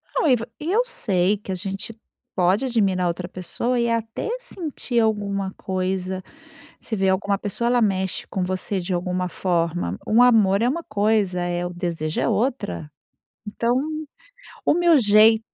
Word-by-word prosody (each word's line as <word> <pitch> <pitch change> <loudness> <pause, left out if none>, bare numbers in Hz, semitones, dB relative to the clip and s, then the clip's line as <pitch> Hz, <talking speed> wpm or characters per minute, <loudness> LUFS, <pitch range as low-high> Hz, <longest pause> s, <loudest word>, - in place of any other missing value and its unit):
Não - - +2
e 255 - +6
va 230 0 -5
e 320 +4 -3
eu 455 +4 +4
sei 195 - +2
que 195 -1 -8
a - - -1
gente 195 +4 -4 0.4
pode 190 +7 +2
admirar 195 -7 +1
outra 175 +1 -3
pessoa 185 +8 -2
e 235 0 +1
até 230 - -2
sentir 300 - -2
alguma 200 -3 0
coisa. 185 0 -2 0.6
Você 220 - -4
vê 190 -1 +2
alguma 200 +1 +1
pessoa, 210 +4 -2
ela 245 0 +3
mexe 190 -3 0
com 190 - -2
você 185 +1 -2
de 180 +1 -3
alguma 180 +1 -1
forma. 170 - -1
Um 225 +3 +5
amor 215 -5 +5
é 240 - +3
uma 335 +5 -2
coisa, 205 - +1
eh, 175 0 -1
o 175 - -5
desejo 170 -3 -2
é - - +1
outra. 215 - -1 0.6
Então 235 +4 0 0.9
o - - +4
meu 340 -3 +5
jei 215 0 +6
200 Hz, 165 wpm, -23 LUFS, 185-230 Hz, 0.9 s, e